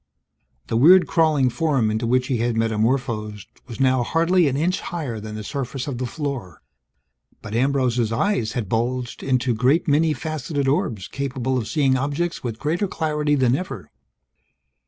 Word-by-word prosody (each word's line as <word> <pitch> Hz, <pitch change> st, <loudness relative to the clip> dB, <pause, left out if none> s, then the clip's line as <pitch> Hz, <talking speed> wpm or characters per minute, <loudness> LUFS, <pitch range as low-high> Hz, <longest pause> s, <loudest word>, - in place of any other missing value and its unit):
The 115 Hz, -, -1 dB
weird 175 Hz, +9 st, +7 dB
crawling 155 Hz, -6 st, +2 dB
form 135 Hz, -8 st, +1 dB
into 110 Hz, +2 st, -1 dB
which 125 Hz, +1 st, +2 dB
he 130 Hz, -2 st, -1 dB
had 120 Hz, 0 st, 0 dB
metamorphosed 110 Hz, -2 st, -1 dB, 0.2 s
was 120 Hz, 0 st, -9 dB
now 130 Hz, -1 st, +3 dB
hardly 165 Hz, +6 st, +2 dB
an 135 Hz, -1 st, 0 dB
inch 175 Hz, +5 st, 0 dB
higher 145 Hz, -10 st, -4 dB
than 105 Hz, 0 st, -7 dB
the 110 Hz, -, -6 dB
surface 135 Hz, +2 st, -4 dB
of 130 Hz, -4 st, -4 dB
the 130 Hz, -, -2 dB
floor. 125 Hz, -, -5 dB, 0.8 s
But 105 Hz, -, -7 dB
Ambrose's 125 Hz, -2 st, +1 dB
eyes 115 Hz, -, 0 dB
had 115 Hz, -6 st, -3 dB
bulged 120 Hz, +3 st, -2 dB
into 130 Hz, -2 st, +1 dB
great 130 Hz, +10 st, +2 dB
many 155 Hz, +2 st, +3 dB
faceted 150 Hz, -2 st, -3 dB
orbs 115 Hz, -8 st, 0 dB
capable 130 Hz, -2 st, -3 dB
of 120 Hz, -4 st, -2 dB
seeing 135 Hz, -4 st, +2 dB
objects 145 Hz, +6 st, -2 dB
with 115 Hz, -3 st, -4 dB
greater 160 Hz, -, -1 dB
clarity 150 Hz, -4 st, 0 dB
than 130 Hz, -2 st, +3 dB
ever. 135 Hz, -, -6 dB
130 Hz, 160 wpm, -22 LUFS, 115-150 Hz, 0.8 s, weird